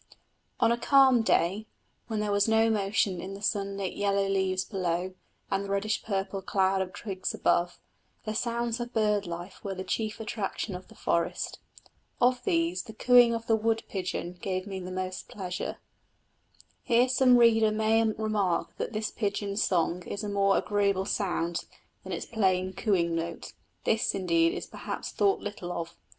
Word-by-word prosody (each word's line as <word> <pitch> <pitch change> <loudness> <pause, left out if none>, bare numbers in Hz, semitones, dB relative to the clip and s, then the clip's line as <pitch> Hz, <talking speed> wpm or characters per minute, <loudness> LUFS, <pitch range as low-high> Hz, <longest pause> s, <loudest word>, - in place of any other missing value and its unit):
On 230 - +4
a 235 - +1
calm 265 -3 +5
day, 205 0 +1 0.4
when 220 -2 -2
there 210 -1 -1
was 205 +1 +3
no 225 0 +4
motion 195 -3 +1
in 195 +2 -6
the 200 - -10
sunlit 200 -2 -1
yellow 200 -1 +1
leaves 190 -1 0
below 185 -2 -2 0.4
and 195 0 +1
the 200 - -7
reddish 200 +2 0
purple 195 -1 -2
cloud 190 0 +1
of 185 -1 -3
twigs 190 0 -4
above, 175 0 +1 0.5
the 215 - -2
sounds 235 +1 -1
of 240 0 -5
bird 210 -3 +1
life 175 +2 -7
were 195 -1 -3
the 185 - -4
chief 215 +1 -2
attraction 215 -2 -3
of 180 +1 -8
the - - -16
forest. 170 0 -1 0.6
Of 245 0 +3
these 170 +2 +1
the 220 - -11
cooing 245 0 +6
of 230 0 -5
the 225 - +3
wood 225 +1 0
pigeon 180 -2 -3
gave 185 -1 -2
me 195 -2 -5
the 180 0 -6
most 185 0 -4
pleasure. 180 -3 -5 1.0
Here 240 +1 +3
some 255 -1 +5
reader 225 -2 +5
may 220 +1 +3
remark 215 -4 0
that - - -3
this 215 0 -2
pigeon's 200 -1 -1
song 175 0 +1
is 200 - -4
a 210 - -3
more 200 -1 +3
agreeable 200 -2 +1
sound 175 -5 -1 0.4
than - - -8
its - - -3
plain 190 -4 +1
cooing 175 -4 +1
note. 165 0 -4 0.3
This, 225 0 +1
indeed, 170 -3 +2
is - - -5
perhaps - - -6
thought 395 -1 +2
little 205 -4 -5
of. 170 -1 -5
200 Hz, 170 wpm, -28 LUFS, 185-220 Hz, 1.0 s, cooing